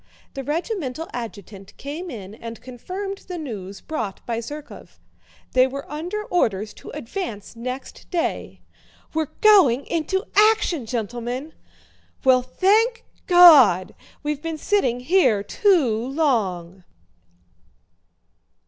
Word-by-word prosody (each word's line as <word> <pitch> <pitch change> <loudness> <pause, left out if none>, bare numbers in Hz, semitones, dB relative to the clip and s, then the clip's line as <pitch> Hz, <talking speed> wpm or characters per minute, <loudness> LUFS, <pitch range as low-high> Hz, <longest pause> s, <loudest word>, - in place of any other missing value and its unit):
The 275 - -5
regimental 320 - -3
adjutant 205 -4 -8
came 315 +6 -6
in 205 - -8
and 230 +1 -9
confirmed 375 - -6
the 360 -1 -5
news 200 - -7
brought 220 -11 -5
by 230 -1 -2
Zherkóv. 290 +6 -9 0.5
They 255 0 +4
were 275 +2 -7
under 350 +8 -4
orders 215 - 0
to - - -10
advance 230 - -6
next 255 +3 -7
day. 345 -2 -3 0.5
"We're 315 -2 -1
going 365 - +6
into 340 +4 -1
action, 415 - +3
gentlemen!" 245 +5 -4 0.7
"Well, 260 -2 +5
thank 420 - +2 0.2
God! 290 - +7 0.3
We've 295 -1 -2
been 325 -1 -4
sitting 265 - 0
here 250 - +3
too 305 - +2
long!" 195 - -1
275 Hz, 110 wpm, -23 LUFS, 230-350 Hz, 0.7 s, God